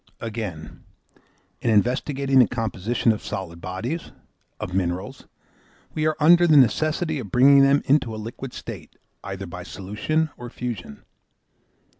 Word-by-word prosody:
Again, 105 Hz, -8 st, -6 dB, 0.8 s
in 120 Hz, -, 0 dB
investigating 130 Hz, +5 st, +2 dB
the 125 Hz, -, +6 dB
composition 115 Hz, 0 st, 0 dB
of 105 Hz, -, -4 dB
solid 90 Hz, -5 st, -6 dB
bodies, 115 Hz, -, -4 dB, 0.5 s
of 90 Hz, -, -5 dB
minerals, 90 Hz, +1 st, -3 dB, 0.7 s
we 155 Hz, 0 st, 0 dB
are 155 Hz, -, +1 dB
under 175 Hz, +3 st, +6 dB
the 155 Hz, -2 st, +6 dB
necessity 155 Hz, +4 st, +2 dB
of 110 Hz, -6 st, -7 dB
bringing 140 Hz, +3 st, +6 dB
them 140 Hz, +1 st, +4 dB
into 130 Hz, -5 st, +2 dB
a -, -, -6 dB
liquid 115 Hz, +4 st, -7 dB
state, -, -, -9 dB, 0.3 s
either 95 Hz, 0 st, -6 dB
by 90 Hz, 0 st, -8 dB
solution 105 Hz, -, -2 dB
or 120 Hz, 0 st, -8 dB
fusion. 115 Hz, -, -7 dB
120 Hz, 135 wpm, -23 LUFS, 100-140 Hz, 0.8 s, the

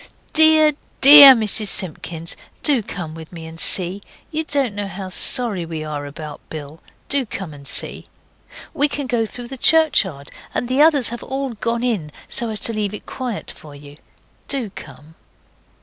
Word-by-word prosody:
Dear, 315 Hz, -1 st, +5 dB, 0.3 s
DEAR 280 Hz, -1 st, +11 dB
Mrs 215 Hz, -1 st, +1 dB
Simpkins, 170 Hz, -3 st, -1 dB, 0.3 s
do 280 Hz, -6 st, +3 dB
come 175 Hz, -6 st, -7 dB
with 160 Hz, -1 st, -11 dB
me 165 Hz, -2 st, -10 dB
and 160 Hz, 0 st, -10 dB
see! 185 Hz, +3 st, +1 dB, 0.3 s
You 315 Hz, 0 st, -2 dB
don't 280 Hz, -7 st, -1 dB
know 205 Hz, 0 st, -4 dB
how 190 Hz, -1 st, -8 dB
sorry 210 Hz, -1 st, +2 dB
we 160 Hz, -2 st, -6 dB
are 145 Hz, -2 st, -6 dB
about 150 Hz, +1 st, -9 dB
Bill. 155 Hz, +1 st, -9 dB, 0.3 s
Do 280 Hz, -1 st, 0 dB
come 195 Hz, -8 st, -7 dB
and 140 Hz, -1 st, -13 dB
see. -, -, -3 dB, 0.7 s
We 290 Hz, -, +2 dB
can 285 Hz, -1 st, -5 dB
go 240 Hz, -3 st, -1 dB
through 240 Hz, +2 st, -9 dB
the 270 Hz, -, -8 dB
churchyard, 210 Hz, -, +2 dB, 0.2 s
and 245 Hz, -, -2 dB
the 260 Hz, +3 st, +1 dB
others 300 Hz, -5 st, +4 dB
have 240 Hz, +1 st, -7 dB
all 270 Hz, +1 st, -4 dB
gone 230 Hz, +1 st, -3 dB
in, 205 Hz, -12 st, -2 dB, 0.2 s
so 235 Hz, -, 0 dB
as 215 Hz, -1 st, -4 dB
to 230 Hz, -, -2 dB
leave 210 Hz, -1 st, -3 dB
it -, -, -12 dB
quiet 250 Hz, -5 st, -6 dB
for 150 Hz, -2 st, -14 dB
you. 145 Hz, 0 st, -14 dB, 0.5 s
Do 255 Hz, -8 st, -2 dB
come. 150 Hz, -2 st, -13 dB
210 Hz, 175 wpm, -19 LUFS, 160-265 Hz, 0.7 s, DEAR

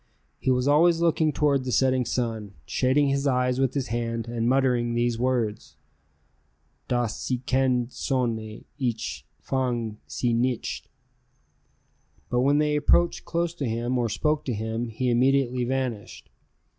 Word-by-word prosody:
He -, -, -1 dB
was 125 Hz, +1 st, +2 dB
always 165 Hz, +3 st, +4 dB
looking 160 Hz, -2 st, +2 dB
toward 145 Hz, -3 st, +1 dB
the 130 Hz, -, -3 dB
setting 130 Hz, 0 st, +2 dB
sun, 110 Hz, -5 st, -3 dB
shading 135 Hz, -, +2 dB
his 140 Hz, +1 st, 0 dB
eyes 125 Hz, -1 st, +1 dB
with 135 Hz, 0 st, +1 dB
his 135 Hz, -3 st, -2 dB
hand 115 Hz, 0 st, -2 dB
and 115 Hz, 0 st, -1 dB
muttering 125 Hz, -3 st, +2 dB
these 120 Hz, -1 st, 0 dB
words: 120 Hz, -4 st, -1 dB, 1.1 s
"Das 120 Hz, -4 st, 0 dB
sinkende 130 Hz, -1 st, 0 dB
Sonne, 115 Hz, -6 st, -2 dB
ich 120 Hz, -4 st, -3 dB
fange 120 Hz, -5 st, -2 dB
sie 120 Hz, -2 st, -1 dB
nicht." 120 Hz, +1 st, -1 dB, 1.4 s
But 125 Hz, -, +2 dB
when 140 Hz, +3 st, +3 dB
they 150 Hz, 0 st, +2 dB
approached 170 Hz, +3 st, +2 dB
close 170 Hz, 0 st, -1 dB
to 145 Hz, -6 st, -3 dB
him, 120 Hz, +3 st, -1 dB
or 120 Hz, -1 st, 0 dB
spoke 150 Hz, +8 st, 0 dB
to 125 Hz, -, -2 dB
him, 110 Hz, +2 st, -3 dB
he 125 Hz, +3 st, -1 dB
immediately 125 Hz, 0 st, +2 dB
vanished. 125 Hz, -4 st, -4 dB
125 Hz, 140 wpm, -26 LUFS, 120-135 Hz, 1.4 s, always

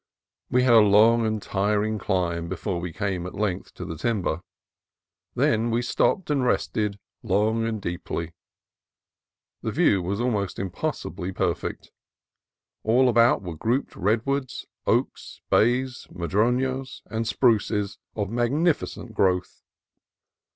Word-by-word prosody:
We 125 Hz, 0 st, +3 dB
had 125 Hz, -2 st, +5 dB
a 115 Hz, -, +9 dB
long 110 Hz, +2 st, +5 dB
and 110 Hz, 0 st, -1 dB
tiring 105 Hz, +2 st, 0 dB
climb 85 Hz, -4 st, -1 dB
before 95 Hz, 0 st, -3 dB
we 90 Hz, -1 st, -4 dB
came 95 Hz, -2 st, -2 dB
at -, -, -9 dB
length 100 Hz, -3 st, -2 dB
to -, -, -6 dB
the 80 Hz, -, -5 dB
timber. 95 Hz, -6 st, -1 dB, 0.9 s
Then 115 Hz, +1 st, +2 dB
we 120 Hz, +1 st, 0 dB
stopped 160 Hz, +7 st, +1 dB
and 140 Hz, -3 st, +1 dB
rested 105 Hz, -4 st, 0 dB, 0.2 s
long 110 Hz, +4 st, +1 dB
and 110 Hz, -1 st, -2 dB
deeply. 85 Hz, -2 st, -4 dB, 1.3 s
The -, -, -2 dB
view 95 Hz, -, +3 dB
was 95 Hz, +4 st, -2 dB
almost 105 Hz, -6 st, -1 dB
impossibly 90 Hz, 0 st, -4 dB
perfect. -, -, -3 dB, 0.9 s
All 125 Hz, +4 st, +4 dB
about 115 Hz, -3 st, +4 dB
were 90 Hz, -2 st, -5 dB
grouped 115 Hz, -, -1 dB
redwoods, 120 Hz, +7 st, -1 dB, 0.2 s
oaks, -, -, -1 dB
bays, 125 Hz, +2 st, +2 dB
madronos, 125 Hz, +9 st, -1 dB
and 115 Hz, 0 st, -3 dB
spruces 105 Hz, -4 st, +1 dB, 0.2 s
of 105 Hz, -2 st, -2 dB
magnificent 120 Hz, 0 st, 0 dB
growth. 90 Hz, -3 st, 0 dB
110 Hz, 125 wpm, -25 LUFS, 95-120 Hz, 1.3 s, a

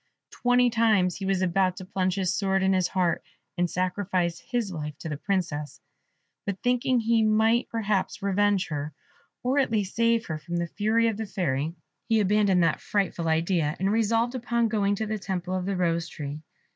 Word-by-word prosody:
Twenty 245 Hz, 0 st, +3 dB
times 215 Hz, -6 st, +2 dB
he 195 Hz, -, -4 dB
was 190 Hz, -1 st, +1 dB
about 185 Hz, 0 st, +1 dB
to 185 Hz, -, -7 dB
plunge 185 Hz, -1 st, -1 dB
his 190 Hz, -2 st, 0 dB
sword 195 Hz, -1 st, +1 dB
in 190 Hz, 0 st, +3 dB
his 185 Hz, -2 st, +2 dB
heart, 180 Hz, -3 st, 0 dB, 0.3 s
and 175 Hz, -1 st, 0 dB
sacrifice 180 Hz, -1 st, -1 dB
his 240 Hz, -6 st, -2 dB
life 150 Hz, -4 st, -5 dB
to 160 Hz, -, -6 dB
the 150 Hz, -, -2 dB
Princess; 155 Hz, -6 st, -2 dB, 0.6 s
but 200 Hz, -2 st, -3 dB
thinking 250 Hz, 0 st, +2 dB
he 230 Hz, 0 st, +2 dB
might 220 Hz, +2 st, +3 dB
perhaps 210 Hz, -4 st, -1 dB
revenge 200 Hz, 0 st, +2 dB
her, 150 Hz, 0 st, -4 dB, 0.5 s
or 260 Hz, +3 st, +2 dB
at 270 Hz, -, +2 dB
least 205 Hz, -4 st, -1 dB
save 230 Hz, 0 st, +2 dB
her 155 Hz, -4 st, -4 dB
from 170 Hz, +3 st, -4 dB
the 170 Hz, -, 0 dB
fury 220 Hz, +6 st, +1 dB
of 220 Hz, -3 st, -1 dB
the 220 Hz, -1 st, -4 dB
Fairy, 165 Hz, -5 st, -1 dB, 0.3 s
he 225 Hz, -1 st, +4 dB
abandoned 200 Hz, -3 st, +3 dB
that 165 Hz, -, +1 dB
frightful 185 Hz, -5 st, -1 dB
idea, 160 Hz, -1 st, +1 dB
and 195 Hz, +2 st, +1 dB
resolved 230 Hz, +2 st, +1 dB
upon 235 Hz, -2 st, 0 dB
going 205 Hz, -2 st, +1 dB
to 220 Hz, -, -2 dB
the 215 Hz, 0 st, -3 dB
temple 185 Hz, -2 st, -3 dB
of 185 Hz, 0 st, -2 dB
the 200 Hz, -2 st, -1 dB
Rose 170 Hz, -2 st, 0 dB
tree. 150 Hz, -1 st, -6 dB
195 Hz, 190 wpm, -26 LUFS, 175-220 Hz, 0.6 s, he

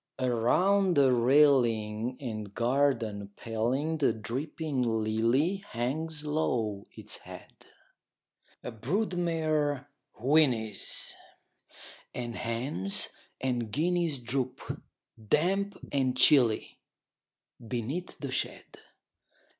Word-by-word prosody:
Around 175 Hz, -, +3 dB
the 135 Hz, -2 st, +5 dB
railing 120 Hz, -3 st, +3 dB
and 110 Hz, -6 st, -6 dB
garden 115 Hz, -5 st, +1 dB
paling 130 Hz, +8 st, -1 dB
The 140 Hz, -, +4 dB
dripping 135 Hz, +6 st, -3 dB
lily 115 Hz, -, +1 dB
hangs 155 Hz, -, -3 dB
low 115 Hz, -9 st, -1 dB
its -, -, -9 dB
head: -, -, -13 dB, 1.0 s
A 125 Hz, -, -5 dB
brood 180 Hz, -, -1 dB
mare 155 Hz, -5 st, 0 dB, 0.3 s
whinnies; 120 Hz, -6 st, +1 dB, 1.0 s
and 120 Hz, -1 st, -4 dB
hens 115 Hz, -4 st, -1 dB, 0.3 s
and 125 Hz, -4 st, -1 dB
guineas 170 Hz, +1 st, +1 dB
Droop, 125 Hz, +1 st, -3 dB, 0.4 s
damp 195 Hz, -, +1 dB
and 130 Hz, -2 st, +1 dB
chilly, 125 Hz, -4 st, +4 dB, 0.9 s
beneath 130 Hz, +10 st, -3 dB
the -, -, -5 dB
shed. -, -, -4 dB
130 Hz, 85 wpm, -29 LUFS, 115-155 Hz, 1.0 s, the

